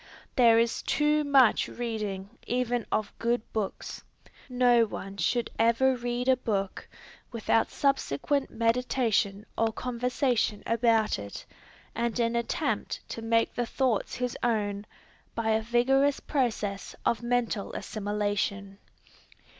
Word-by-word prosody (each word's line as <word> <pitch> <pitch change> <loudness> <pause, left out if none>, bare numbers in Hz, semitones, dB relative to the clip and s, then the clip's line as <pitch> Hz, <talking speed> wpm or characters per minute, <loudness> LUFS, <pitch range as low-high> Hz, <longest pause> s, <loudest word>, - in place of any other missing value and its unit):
There 235 -3 +6
is 230 0 +1
too 300 0 +2
much 275 -5 +4
reading 210 -5 -4 0.2
even 245 -1 -1
of 215 -1 -1
good 235 0 0
books. 215 -3 -4 0.5
No 245 -2 +4
one 195 -2 -6
should 235 +7 0
ever 235 +4 +4
read 245 +1 -3
a 260 - +6
book, 200 -5 -2 0.4
without 225 -1 +1
subsequent 275 - 0
meditation 230 -3 +1
or 225 0 +1
conversation 245 -2 -1
about 230 -2 +2
it, 100 0 -8 0.5
and 235 +1 -1
an 230 0 +1
attempt 235 0 -2
to 230 - -5
make 230 0 +1
the 240 -1 -2
thoughts 255 -5 0
his 250 -1 -2
own, 210 -3 -1 0.5
by 225 -1 0
a 220 0 +2
vigorous 265 +5 +2
process 220 -8 -2
of 235 - +1
mental 235 -4 -1
assimilation. 205 -1 -2
230 Hz, 120 wpm, -28 LUFS, 215-245 Hz, 0.5 s, There